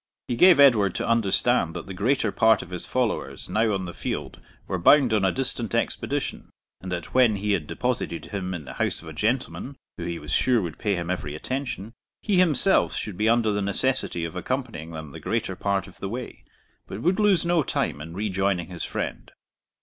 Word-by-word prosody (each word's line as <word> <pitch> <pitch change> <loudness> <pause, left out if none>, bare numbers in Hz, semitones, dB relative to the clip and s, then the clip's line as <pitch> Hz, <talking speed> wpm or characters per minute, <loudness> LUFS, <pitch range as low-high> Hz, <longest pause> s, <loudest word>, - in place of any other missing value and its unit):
He 120 - -1
gave 180 +3 +7
Edward 110 -9 +6
to - - -2
understand 115 -4 +2
that 85 - -5
the 95 - -7
greater 110 +3 +1
part 110 +2 +4
of 90 - -14
his 90 - -4
followers 125 -4 -2
now 110 0 +1
on 95 -2 -1
the 85 - -6
field - - -5 0.3
were 95 - -2
bound 130 - +5
on 105 -2 +2
a 95 - +3
distant 125 -4 -2
expedition, - - -2 0.3
and 95 - -6
that 85 -1 -5
when 125 -4 +5
he 105 +1 -1
had 85 -7 0
deposited 125 -9 -2
him 95 -2 -4
in 80 -4 -7
the - - -8
house - - -1
of - - -12
a 80 - -7
gentleman, 125 - -2 0.2
who 85 - -4
he 85 -1 -3
was 75 -2 -8
sure 125 -2 +3
would 85 -6 -5
pay 105 -3 0
him 85 0 -3
every 75 -5 -3
attention, 115 - -4 0.3
he 200 -3 +2
himself 180 +1 +3
should 105 - -4
be 110 +4 +1
under 115 -2 +3
the 105 0 -1
necessity 100 -3 +1
of 85 - -7
accompanying 115 - -3
them 80 -3 -8
the - - -9
greater - - -2
part 100 -1 -1
of 95 - -15
the 95 - -4
way, 120 +3 -7 0.4
but 95 - -7
would 180 +5 +2
lose 205 -5 +3
no 170 -1 +3
time 70 - -2
in 80 +2 -8
rejoining 95 -3 -1
his 90 -2 -5
friend. - - -4
105 Hz, 210 wpm, -25 LUFS, 90-125 Hz, 0.4 s, gave